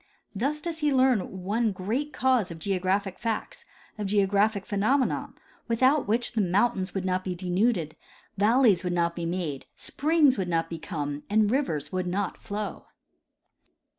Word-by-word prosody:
Thus 280 +9 -1
does 330 -1 -4
he 300 -1 +2
learn 250 -8 +2
one 220 +3 +1
great 225 +11 -2
cause 255 -9 +2
of 170 - -7
geographic 190 +2 -1
facts, 230 - -4 0.3
of 205 - -2
geographic 200 +1 +2
phe 210 - -4
nomena, 260 +6 +1 0.3
without 255 +4 +3
which 230 +3 +1
the 225 - 0
mountains 190 +1 +1
would 190 -1 -2
not 185 0 0
be 185 -1 -3
denuded, 180 -2 0 0.4
valleys 210 -2 +4
would 180 -1 -1
not 170 -1 +1
be 170 -1 -3
made, 170 -6 -3
springs 295 -5 +2
would 185 -2 -2
not 165 -1 0
become, 150 -3 -4
and 210 0 +3
rivers 160 - -1
would 185 -1 -2
not 195 +3 -2
flow. 205 +1 -5
200 Hz, 155 wpm, -27 LUFS, 180-240 Hz, 0.4 s, valleys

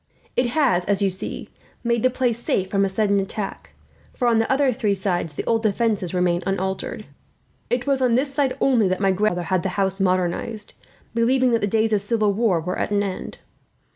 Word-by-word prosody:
It 250 - +2
has, 245 - +3
as 200 0 +2
you 195 - +2
see, 185 - -5 0.3
made 235 -1 +1
the 255 - +4
place 245 -2 -1
safe 190 -5 -1
from 195 -1 +2
a 195 - +1
sudden 200 0 +1
attack, 195 +1 -5 0.4
for 245 - 0
on 230 -1 +4
the 225 - 0
other 270 0 +3
three 210 -2 0
sides 180 -5 -2
the - - -5
old 225 -1 +1
defences 215 -4 0
remain 180 -1 +1
unaltered. 190 0 -3 0.6
It 245 0 0
was 275 -2 +1
on 245 -2 +3
this 275 +2 0
side, 275 -2 0
only, 240 -7 +3
that 185 0 -1
my 195 -1 +3
grandfather 185 -2 0
had 185 - +3
the 195 - -2
house 195 0 0
modernized, 185 +3 -1 0.4
believing 250 +2 +2
that 230 - +2
the 205 - +1
days 220 +1 +1
of 205 - +2
civil 210 -1 +1
war 205 -5 +2
were 180 +3 -3
at - - -1
an 205 -1 +1
end. 190 -2 -5
210 Hz, 205 wpm, -22 LUFS, 190-235 Hz, 0.6 s, the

